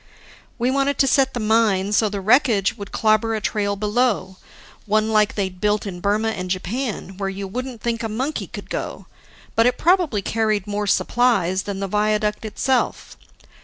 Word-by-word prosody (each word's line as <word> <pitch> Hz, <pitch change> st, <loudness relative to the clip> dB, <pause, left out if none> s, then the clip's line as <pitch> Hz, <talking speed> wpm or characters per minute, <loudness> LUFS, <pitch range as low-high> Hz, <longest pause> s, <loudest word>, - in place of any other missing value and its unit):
We 245 Hz, +1 st, +1 dB
wanted 275 Hz, +1 st, +1 dB
to -, -, +4 dB
set 265 Hz, 0 st, +2 dB
the -, -, -1 dB
mine 215 Hz, -3 st, +2 dB
so 215 Hz, 0 st, +3 dB
the 200 Hz, -1 st, -4 dB
wreckage 225 Hz, -2 st, +3 dB
would 200 Hz, -3 st, -9 dB
clobber 220 Hz, +1 st, +2 dB
a -, -, -1 dB
trail 205 Hz, -1 st, -1 dB
below, 210 Hz, -2 st, 0 dB, 0.5 s
one 215 Hz, +1 st, +2 dB
like 210 Hz, -1 st, +3 dB
they'd 190 Hz, -3 st, -3 dB
built 210 Hz, 0 st, +1 dB
in 185 Hz, -3 st, -6 dB
Burma 210 Hz, +4 st, +1 dB
and 185 Hz, -4 st, -4 dB
Japan, 195 Hz, +1 st, -3 dB
where 195 Hz, -1 st, -2 dB
you 195 Hz, 0 st, -5 dB
wouldn't 250 Hz, +2 st, -6 dB
think 230 Hz, -1 st, -1 dB
a 225 Hz, -, -3 dB
monkey 260 Hz, +8 st, -3 dB
could -, -, -9 dB
go; -, -, -4 dB, 0.5 s
but 230 Hz, +1 st, +4 dB
it 250 Hz, -, +1 dB
probably 335 Hz, -, +2 dB
carried 215 Hz, -3 st, 0 dB
more 205 Hz, 0 st, -3 dB
supplies 195 Hz, -5 st, +2 dB
than 195 Hz, -1 st, -4 dB
the 195 Hz, -, -1 dB
viaduct 210 Hz, +1 st, 0 dB
itself. 250 Hz, +4 st, -1 dB
215 Hz, 175 wpm, -21 LUFS, 200-235 Hz, 0.5 s, to